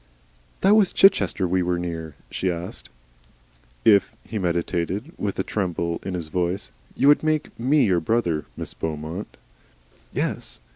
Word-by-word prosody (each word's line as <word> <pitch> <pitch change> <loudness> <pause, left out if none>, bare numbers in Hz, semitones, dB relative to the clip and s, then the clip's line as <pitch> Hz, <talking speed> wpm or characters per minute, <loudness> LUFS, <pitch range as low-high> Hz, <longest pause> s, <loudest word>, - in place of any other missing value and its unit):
"That 200 +2 +6
was 210 -4 +4
Chichester 105 - +4
we 90 +1 +1
were 90 0 0
near?" 80 -3 -5 0.2
she 95 - -1
asked. 85 +1 -6 1.0
"If," 100 -3 +5
he 110 - -4
meditated, 90 - -1
with 100 -2 -3
a 95 - 0
tremble 85 -5 -2
in 95 - -4
his 85 -3 -4
voice, 90 +1 -1 0.2
"you 135 - +3
would 145 - +6
make 155 -1 0
ME 135 +4 +4
your 90 -4 +3
brother, 85 -4 0
MISS - - -6
BEAUMONT." 80 +4 -5 0.7
"Yes?" - - -3
90 Hz, 145 wpm, -24 LUFS, 85-110 Hz, 1.0 s, That